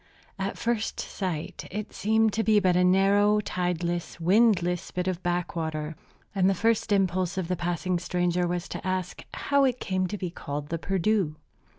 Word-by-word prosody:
At 195 Hz, +1 st, -2 dB
first 235 Hz, -2 st, -1 dB
sight 175 Hz, -6 st, -4 dB
it 210 Hz, +2 st, -5 dB
seemed 220 Hz, 0 st, +2 dB
to 225 Hz, -, +1 dB
be 215 Hz, -1 st, +4 dB
but 185 Hz, -3 st, +2 dB
a 180 Hz, -, +4 dB
narrow, 200 Hz, +3 st, +4 dB
tideless, 175 Hz, -3 st, -2 dB
windless 180 Hz, -1 st, +3 dB
bit 180 Hz, 0 st, -3 dB
of 185 Hz, -1 st, -1 dB
backwater; 160 Hz, -3 st, -2 dB, 0.4 s
and 190 Hz, -1 st, +3 dB
the 195 Hz, -, +2 dB
first 225 Hz, +2 st, +1 dB
impulse 185 Hz, -2 st, +1 dB
of 185 Hz, -3 st, -1 dB
the 180 Hz, -, 0 dB
passing 175 Hz, +1 st, -1 dB
stranger 175 Hz, 0 st, 0 dB
was 175 Hz, +1 st, -2 dB
to -, -, -5 dB
ask 185 Hz, -1 st, -2 dB
how 280 Hz, -1 st, +1 dB
it 255 Hz, -2 st, +2 dB
came 185 Hz, -1 st, -1 dB
to 210 Hz, -, -4 dB
be 180 Hz, -3 st, -4 dB
called 145 Hz, -3 st, -5 dB
the 165 Hz, -, -2 dB
"Perdu." 195 Hz, -3 st, +1 dB
185 Hz, 175 wpm, -27 LUFS, 175-205 Hz, 0.4 s, be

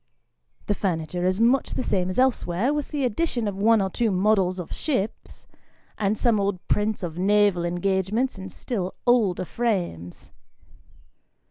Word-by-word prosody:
The -, -, +1 dB
furniture 175 Hz, -2 st, -2 dB
is 185 Hz, +2 st, 0 dB
much 245 Hz, +4 st, +2 dB
the -, -, -1 dB
same 185 Hz, -5 st, 0 dB
as 185 Hz, -, -4 dB
elsewhere, 250 Hz, -2 st, +1 dB
with 295 Hz, -2 st, -3 dB
the 290 Hz, -3 st, -1 dB
addition 240 Hz, -1 st, -1 dB
of 200 Hz, -, -3 dB
one 220 Hz, -1 st, +4 dB
or 190 Hz, -, -2 dB
two 230 Hz, +3 st, 0 dB
models 190 Hz, -1 st, +2 dB
of 180 Hz, -, -6 dB
ships, 255 Hz, -9 st, -3 dB, 0.5 s
and 210 Hz, 0 st, 0 dB
some 230 Hz, -2 st, +2 dB
old 200 Hz, -2 st, -2 dB
prints 210 Hz, -1 st, 0 dB
of 170 Hz, -1 st, -5 dB
naval 200 Hz, -2 st, +3 dB
engagements 190 Hz, +7 st, 0 dB
in 190 Hz, 0 st, -7 dB
still 190 Hz, -2 st, -4 dB
older 215 Hz, -7 st, +2 dB
frames. 175 Hz, -, -3 dB
200 Hz, 150 wpm, -24 LUFS, 180-230 Hz, 0.5 s, one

